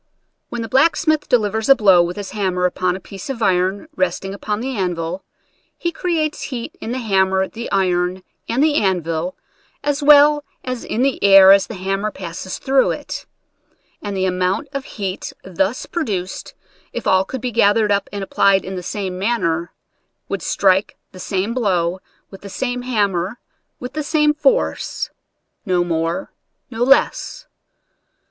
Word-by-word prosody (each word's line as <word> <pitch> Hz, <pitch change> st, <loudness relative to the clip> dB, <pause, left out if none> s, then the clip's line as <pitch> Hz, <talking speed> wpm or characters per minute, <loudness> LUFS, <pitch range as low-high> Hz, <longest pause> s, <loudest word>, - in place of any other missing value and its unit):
When 240 Hz, -1 st, -4 dB
the -, -, -5 dB
blacksmith 310 Hz, +4 st, +2 dB
delivers 220 Hz, 0 st, +1 dB
a 275 Hz, -, +9 dB
blow 195 Hz, -7 st, +5 dB
with 175 Hz, +2 st, -2 dB
his 205 Hz, -2 st, -6 dB
hammer 185 Hz, -4 st, 0 dB
upon 180 Hz, 0 st, 0 dB
a -, -, -6 dB
piece 195 Hz, +5 st, -10 dB
of 240 Hz, -4 st, -3 dB
iron 190 Hz, -, +1 dB
resting 195 Hz, -8 st, -1 dB
upon 205 Hz, +1 st, -3 dB
the 260 Hz, +2 st, -3 dB
anvil, 180 Hz, -2 st, -2 dB, 0.5 s
he 340 Hz, -, -2 dB
creates 320 Hz, -3 st, -1 dB
heat 240 Hz, -4 st, -6 dB
in 225 Hz, -, -4 dB
the 250 Hz, -, -2 dB
hammer, 190 Hz, -4 st, +1 dB
the 230 Hz, +1 st, -7 dB
iron, 185 Hz, -1 st, 0 dB, 0.3 s
and 255 Hz, +5 st, +2 dB
the 310 Hz, -1 st, +3 dB
anvil, 180 Hz, -, 0 dB, 0.5 s
as 290 Hz, 0 st, 0 dB
well 295 Hz, 0 st, +6 dB, 0.2 s
as 255 Hz, -2 st, -4 dB
in 235 Hz, -, -1 dB
the 270 Hz, -5 st, 0 dB
air 195 Hz, -1 st, +9 dB
as 195 Hz, 0 st, +5 dB
the 225 Hz, -, -7 dB
hammer 195 Hz, +3 st, -2 dB
passes 185 Hz, -1 st, -6 dB
through 270 Hz, 0 st, +2 dB
it; -, -, -5 dB, 0.7 s
and 200 Hz, -1 st, -4 dB
the 190 Hz, -, +1 dB
amount 185 Hz, +8 st, -1 dB
of 275 Hz, -1 st, -4 dB
heat 195 Hz, -2 st, -5 dB
thus 190 Hz, +5 st, -1 dB
produced, 195 Hz, -, -4 dB, 0.4 s
if -, -, -5 dB
all 190 Hz, 0 st, +4 dB
could 260 Hz, +7 st, -6 dB
be 250 Hz, -, -2 dB
gathered 210 Hz, -1 st, +3 dB
up 200 Hz, -1 st, 0 dB
and 200 Hz, -1 st, -4 dB
applied 195 Hz, 0 st, +2 dB
in 190 Hz, +1 st, -5 dB
the 180 Hz, -, -4 dB
same 185 Hz, 0 st, -4 dB
man 230 Hz, +4 st, 0 dB
ner, 170 Hz, +1 st, -1 dB, 0.6 s
would -, -, -3 dB
strike 195 Hz, +1 st, +2 dB
the 185 Hz, -, -12 dB
same 195 Hz, +4 st, -2 dB
blow, 185 Hz, -7 st, 0 dB, 0.3 s
with 195 Hz, -, -11 dB
the 200 Hz, -, -9 dB
same 245 Hz, +4 st, -3 dB
hammer, 205 Hz, -4 st, -1 dB, 0.4 s
with 250 Hz, +1 st, -7 dB
the 305 Hz, -, -2 dB
same 300 Hz, 0 st, +2 dB
force 295 Hz, -3 st, 0 dB, 0.3 s
— -, -, -52 dB, 0.3 s
no 180 Hz, -1 st, +2 dB
more, 165 Hz, -, -2 dB, 0.4 s
no 225 Hz, -1 st, -6 dB
less. 275 Hz, -, +2 dB
200 Hz, 165 wpm, -19 LUFS, 185-250 Hz, 0.7 s, a